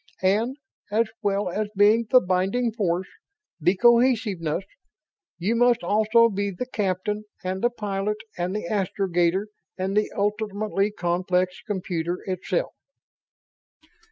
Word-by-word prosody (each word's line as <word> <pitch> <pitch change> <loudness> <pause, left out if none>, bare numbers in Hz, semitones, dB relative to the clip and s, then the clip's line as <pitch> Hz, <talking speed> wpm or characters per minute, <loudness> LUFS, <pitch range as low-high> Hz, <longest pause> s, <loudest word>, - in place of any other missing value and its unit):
And, 220 +8 +2 0.3
as 220 +3 +2 0.2
well 200 0 0
as 210 +3 -1
being 215 +3 +5
the 255 - +7
binding 190 +7 0
force, 190 -4 -1 0.5
the 175 +4 +3
cohesiveness, 220 -7 +3 0.7
you 195 +7 0
must 240 0 +3
also 220 +2 +4
be 200 -2 -2
the 195 +6 -4
captain 210 -2 -2 0.2
and 185 +1 -3
the 240 - +3
pilot 210 -2 -2 0.2
and 180 +2 -2
the 210 - -3
astrogator 185 -1 0 0.3
and 190 +1 -2
the 210 0 +1
ultimately 205 0 0
complex 180 -1 -1
computer 180 -4 -2
itself." 190 - -2
200 Hz, 120 wpm, -25 LUFS, 185-220 Hz, 0.7 s, the